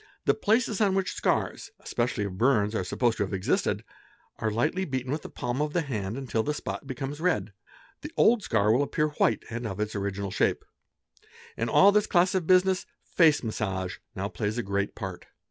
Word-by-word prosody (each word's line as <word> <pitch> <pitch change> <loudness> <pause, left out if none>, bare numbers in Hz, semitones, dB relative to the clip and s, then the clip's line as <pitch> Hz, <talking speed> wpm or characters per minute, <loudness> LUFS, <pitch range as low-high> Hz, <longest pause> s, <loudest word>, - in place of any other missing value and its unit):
The - - +5
places 220 -1 +1
on 195 -2 +3
which 190 -1 0
scars, - - -1
especially 120 -2 -1
of 100 -2 -4
burns, 115 -5 +3
are 110 - 0
supposed 115 +6 0
to - - +1
have 100 0 -3
existed, 95 - 0 0.6
are 110 - 0
lightly 120 - 0
beaten 130 -5 -3
with 150 +2 -2
the - - -9
palm 125 +3 -3
of 150 0 -1
the 175 - +1
hand 110 -6 -3
until 130 -4 -1
the 150 +6 -2
spot 145 - -5
becomes 135 +2 -5
red. 165 - 0 0.5
The 300 - -7
old 230 0 +5
scar 105 - +2
will 125 +5 +3
appear 150 +2 0
white 115 -7 +1
and 120 0 -3
of 100 -1 -6
its 105 0 -2
original 100 -1 -3
shape. - - 0 0.9
In 115 +1 -2
all 195 - +7
this 210 0 +2
class 180 +2 +3
of 185 -4 -1
business 185 0 +3 0.3
face 160 -5 +5
massage 95 -5 -3 0.2
now 95 +1 -2
plays 105 +1 -3
a 120 - -1
great 100 0 -2
part. 95 -4 -7
120 Hz, 195 wpm, -27 LUFS, 105-165 Hz, 0.9 s, all